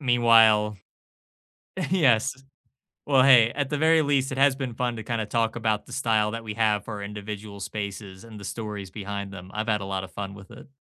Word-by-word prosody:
Meanwhile 115 -5 +4 1.1
Yes, 135 - +3 0.8
well, 135 -3 +5
hey, 120 -4 +7
at 145 0 -2
the 145 - 0
very 160 0 +4
least, 140 -2 +1
it 135 - -4
has 140 0 +4
been 130 -4 -5
fun 120 -1 -2
to 110 - -6
kinda 115 -2 -2
talk 115 +1 -1
about 110 -2 -1
the - - -13
style 110 -5 +1
that 115 0 -5
we 105 -1 -5
have 105 -2 +1
for 105 -3 -6
individual 105 0 -7
spaces 100 -1 -6
and 110 -2 -11
the 100 - -10
stories 105 -3 -6
behind 100 -1 -6
them. 95 -1 -10
I've 110 +1 -3
had 105 -2 +1
a - - -5
lot 95 -1 -3
of 95 - -9
fun 100 -1 -6
with 100 -1 -14
it. - - -13
110 Hz, 205 wpm, -25 LUFS, 100-120 Hz, 1.1 s, hey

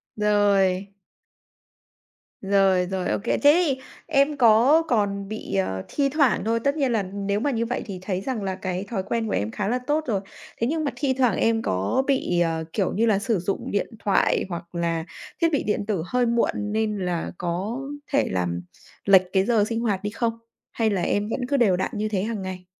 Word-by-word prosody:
Rồi. 200 -2 +2 1.5
Rồi, 195 -2 +3
rồi, 185 -1 -1
ô - - +1
kê. 235 - +1
Thế 295 +5 +5
thì 265 -3 -1 0.3
em 290 -1 +2
có 240 +7 +6
còn 200 -5 0
bị, 215 - -5
ờ, 95 0 -1
thi 280 -1 0
thoảng 280 -4 +2
thôi, 230 +1 +1
tất 280 +1 +1
nhiên 270 -4 +1
là 220 -4 +1
nếu 200 +2 -2
mà 285 +5 0
như 230 -2 0
vậy 245 - -3
thì 190 -4 -6
thấy 185 0 -2
rằng 235 -3 -3
là 190 -1 -2
cái 185 0 -3
thói 195 -5 -2
quen 225 +2 -2
của - - -2
em 105 +2 -1
khá 195 - -3
là 245 +4 0
tốt 305 +1 +1
rồi. 200 -5 0 0.4
Thế 230 - +2
nhưng 315 +3 -1
mà 285 - -1
thi 275 -3 0
thoảng 250 -4 +2
em 225 0 +2
có 95 - 0
bị, 260 -10 +1
ờ, 165 -1 0
kiểu 195 -4 0
như 225 +4 +2
là, 210 -3 +3
sử 220 -3 0
dụng 195 +3 -3
điện 205 - 0
thoại 195 -1 +2
hoặc 170 0 -7
là 165 -1 -1 0.4
thiết 335 - +4
bị 290 - +1
điện 210 -1 -1
tử 200 -6 -1
hơi 250 -1 +1
muộn 235 0 +2
nên 210 0 -1
là 180 -3 -2
có 185 +8 -3 0.3
thể 280 - +2
làm 90 -1 -1 0.4
lệch 190 -2 +7
cái 190 0 +3
giờ 225 -3 +3
sinh 230 +1 -2
hoạt 210 -5 -1
đi 205 - -1
không? 230 +1 -1 0.4
Hay 225 -2 +1
là 195 -3 0
em 205 +4 0
vẫn 230 - -2
cứ 280 +1 +1
đều 205 -7 +4
đặn - - -2
như 215 0 -2
thế 195 -3 -1
hàng 220 -1 -3
ngày? 185 -1 -6
210 Hz, 215 wpm, -24 LUFS, 185-235 Hz, 1.5 s, lệch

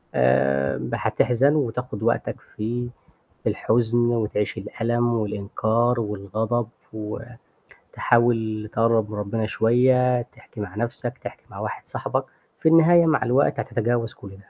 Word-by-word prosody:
آمم 70 +2 +2
هتحزن 135 +5 +2
و - - +3
وتاخُد 120 -4 -3
وقتك 115 - 0 0.2
في 120 +3 -3 0.5
في - - +1
الحزن 115 +1 +1
وتعيش 105 -3 -1
الألم 120 +4 -1
والإنكار 110 +3 0
والغضب 110 +2 -2 1.0
وتحاول 110 -3 0
تقرّب 115 -2 +2
من 105 - -5
ربّنا 105 +2 -2
شوية، 125 +3 +3
تحكي 120 -1 -14
مع 95 -2 -6
نَفْسك، 120 +2 -3
تحكي - - -9
مع - - -10
واحد - - -5
صاحبك. - - -2 0.4
في 160 - +3
النهاية 165 +1 +6
مع 155 -2 +2
الوقت 130 +4 +2
هتتجاوز 115 0 -1
كل 100 - -12
ده. 95 +1 -16
115 Hz, 130 wpm, -23 LUFS, 105-120 Hz, 1.0 s, النهاية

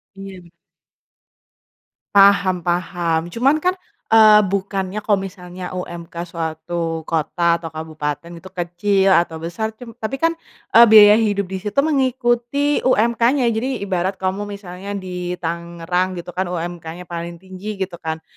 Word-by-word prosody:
Iya. 195 -2 -10 1.7
Paham 195 -3 +5
paham 175 -2 -1
cuman 260 - +2
kan, 365 +3 +1 0.4
eee, 215 -1 +8
bukannya 195 0 -2
kalau 205 -2 +2
misalnya 180 -1 -8
UMK 175 -2 -7
suatu 165 0 -4
kota 170 +2 0
atau 165 - -7
kabupaten 155 0 -5
itu 190 - -12
kecil 190 +2 +1
atau 170 -3 +3
besar 220 +7 -4
cum 235 0 -11
tapi 220 +5 -3
kan, 330 +5 +1 0.4
eee, 235 +1 +9
biaya 210 -1 +9
hidup 205 -3 0
disitu 190 +2 -5
mengikuti 260 0 +1
UMK-nya 235 +2 +2
jadi 235 +1 -2
ibarat 190 0 -1
kamu 190 +2 -3
misalnya 200 0 -7
di 180 -2 -4
Tangerang 170 +2 -2
gitu 175 +1 -7
kan 185 +2 -2
UMK-nya 175 0 -5
paling 170 0 -6
tinggi 190 +3 -7
gitu 180 -3 -8
kan 160 0 -5
185 Hz, 130 wpm, -20 LUFS, 170-210 Hz, 1.7 s, eee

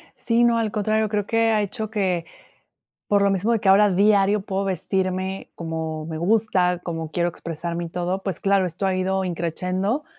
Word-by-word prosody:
Sí, 235 +1 +1
no, 235 -1 +4
al 225 -2 0
contrario, 215 +1 0
creo 205 -1 -1
que 225 +1 +2
ha 215 -1 +2
hecho 215 +2 -4
que, 185 -6 -1 0.8
por 205 -1 +3
lo 200 - +3
mismo 195 +4 +1
de 225 - +1
que 195 - 0
ahora 205 +2 +6
diario 200 +1 +3
puedo 195 -1 -2
vestirme 190 0 -2
como 160 -1 -4
me 160 - -5
gusta, 185 -2 +2
como 165 -3 -5
quiero 175 +1 0
expresarme 170 0 -5
y - - -6
todo, 180 +3 -3
pues, 190 -5 -3
claro, 195 -1 +2
esto 180 +3 -3
ha 190 - +1
ido 190 +1 0
in 180 - -2
crescendo. 185 - -2
190 Hz, 195 wpm, -23 LUFS, 175-210 Hz, 0.8 s, ahora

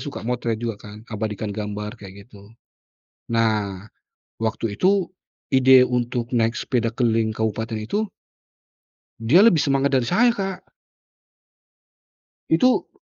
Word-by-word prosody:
suka 140 -3 -7
motret 120 -1 -2
juga 115 -3 -3
kan 105 +1 -12
abadikan 105 -1 -4
gambar 105 +2 -5
kaya 95 -1 -11
gitu. 100 0 -17 0.8
Nah, 105 -3 0 0.5
waktu 110 -1 -2
itu 195 0 +3 0.5
ide 130 -1 +6
untuk 120 -1 -2
naik 115 -1 +1
sepeda 120 -3 -1
keliling 115 -3 +1
kabupaten 110 +1 -2
itu 205 - -2 1.1
dia 140 - +5
lebih 195 -8 +5
semangat 140 -1 +1
dari 120 - -2
saya, 240 - +4
Kak. 195 -4 -3 1.9
Itu 250 +10 +3
115 Hz, 115 wpm, -22 LUFS, 110-135 Hz, 1.9 s, ide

